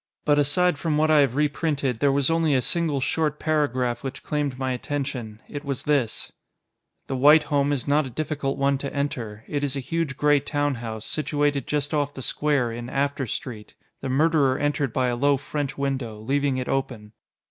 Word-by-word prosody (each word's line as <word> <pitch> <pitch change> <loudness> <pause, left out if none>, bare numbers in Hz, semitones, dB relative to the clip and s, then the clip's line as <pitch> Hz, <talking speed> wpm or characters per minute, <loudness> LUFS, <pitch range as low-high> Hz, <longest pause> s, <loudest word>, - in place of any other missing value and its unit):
But 145 -1 +4
aside 150 +3 +2
from 155 -3 0
what 155 +1 +3
I 155 - +6
have 135 -3 +3
reprinted, 145 -4 0
there 140 +1 +3
was 140 +2 +2
only 165 -3 +2
a 130 - +3
single 165 -5 0
short 150 +2 0
paragraph 130 -6 0
which 135 0 -6
claimed 145 -4 -2
my 130 -1 -1
attention. 125 -4 -4
It 145 0 -6
was 140 -3 -4
this: 140 -7 0 0.7
The 135 - -3
White 150 +4 +6
home 145 -1 +1
is 140 -3 -1
not 145 0 +2
a - - -7
difficult 145 +1 -2
one 140 0 +2
to 140 0 -4
enter. 120 -7 -3
It 145 -1 -2
is 140 -1 -1
a - - -1
huge 150 0 -2
gray 145 0 +4
town 145 0 -1
house, 110 -2 -5
situated 145 -3 0
just 150 0 -1
off 145 -1 0
the 130 - -6
square, 140 -5 +1
in 120 +1 -6
After 140 -1 -1
Street. 110 -1 -6 0.3
The 135 - -3
murderer 140 -1 +3
entered 145 -3 0
by 130 +3 +1
a 120 -1 0
low 140 +3 +3
French 140 +1 -4
window, 135 -6 -2
leaving 140 +4 0
it 125 - -3
open. 125 -6 -3
140 Hz, 195 wpm, -24 LUFS, 130-150 Hz, 0.7 s, I